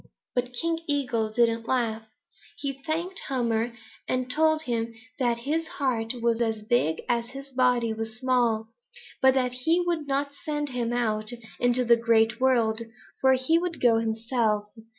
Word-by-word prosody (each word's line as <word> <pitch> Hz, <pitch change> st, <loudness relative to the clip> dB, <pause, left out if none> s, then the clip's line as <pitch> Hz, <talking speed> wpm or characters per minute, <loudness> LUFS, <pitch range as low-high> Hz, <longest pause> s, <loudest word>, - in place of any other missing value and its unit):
But 250 Hz, 0 st, -1 dB
King 330 Hz, +6 st, -1 dB
Eagle 250 Hz, -7 st, 0 dB
didn't 230 Hz, 0 st, +1 dB
laugh. 230 Hz, -4 st, 0 dB, 0.6 s
He 275 Hz, -1 st, -4 dB
thanked 345 Hz, +5 st, -1 dB
Hummer 235 Hz, -2 st, 0 dB, 0.3 s
and 255 Hz, 0 st, -1 dB
told 315 Hz, +2 st, +3 dB
him 230 Hz, -2 st, -2 dB, 0.2 s
that 240 Hz, -2 st, +2 dB
his 305 Hz, +7 st, -2 dB
heart 245 Hz, -4 st, -1 dB
was 235 Hz, 0 st, +2 dB
as 225 Hz, -2 st, -1 dB
big 215 Hz, -9 st, +1 dB
as 235 Hz, -1 st, 0 dB
his 275 Hz, +2 st, -10 dB
body 250 Hz, -3 st, +2 dB
was 220 Hz, 0 st, -5 dB
small, 240 Hz, -3 st, +1 dB, 0.5 s
but 265 Hz, 0 st, +5 dB
that 250 Hz, -2 st, +1 dB
he 320 Hz, +8 st, +2 dB
would 335 Hz, -4 st, -1 dB
not 280 Hz, +1 st, 0 dB
send 295 Hz, 0 st, -3 dB
him 240 Hz, -2 st, -2 dB
out 215 Hz, -3 st, 0 dB, 0.3 s
into 245 Hz, +1 st, +2 dB
the 235 Hz, 0 st, +6 dB
Great 225 Hz, -1 st, +3 dB
World, 235 Hz, -4 st, +2 dB, 0.4 s
for 265 Hz, 0 st, +5 dB
he 260 Hz, +6 st, +3 dB
would 350 Hz, -1 st, -3 dB
go 230 Hz, -2 st, +4 dB
himself. 220 Hz, -2 st, 0 dB
245 Hz, 155 wpm, -26 LUFS, 230-270 Hz, 0.6 s, the